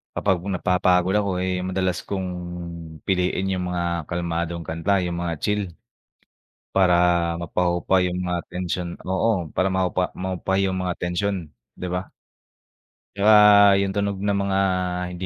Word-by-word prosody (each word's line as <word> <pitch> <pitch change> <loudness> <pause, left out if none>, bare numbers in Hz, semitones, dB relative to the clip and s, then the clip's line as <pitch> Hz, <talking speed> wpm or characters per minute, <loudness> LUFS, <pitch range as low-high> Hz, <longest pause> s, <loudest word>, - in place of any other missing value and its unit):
kapag 95 -3 +1
napapagod 90 0 +2
ako, 100 -1 0
eh, 90 0 -1
'yong 90 +1 -3
madalas 95 -1 0
kong 95 -2 -3 0.8
piliin 95 0 0
yung 90 -1 -2
mga 85 -2 -2
kalmadong 85 -1 -3
kanta, 85 +5 0
yung 85 -1 -3
mga 85 -1 -1
chill 105 0 0 1.1
para 95 -2 +4 0.5
mapahupa 85 +2 +1
yung 90 0 -2
mga 90 -1 -1
tensyon, 90 0 -3 0.2
oo. 95 -2 0
Para 95 - +2
mahupa 90 -1 0
mahupa 95 0 -3
yung 95 -1 0
mga 90 -1 -1
tensyon, 90 +3 -1 0.4
di 90 - -4
ba? 90 +1 -3 1.1
Di - - -11
ba 105 -1 +8
yung 100 -1 -1
tunog 100 -1 -1
ng 100 0 0
mga 95 0 0 0.5
hindi 90 +1 -5
90 Hz, 140 wpm, -23 LUFS, 90-95 Hz, 1.1 s, ba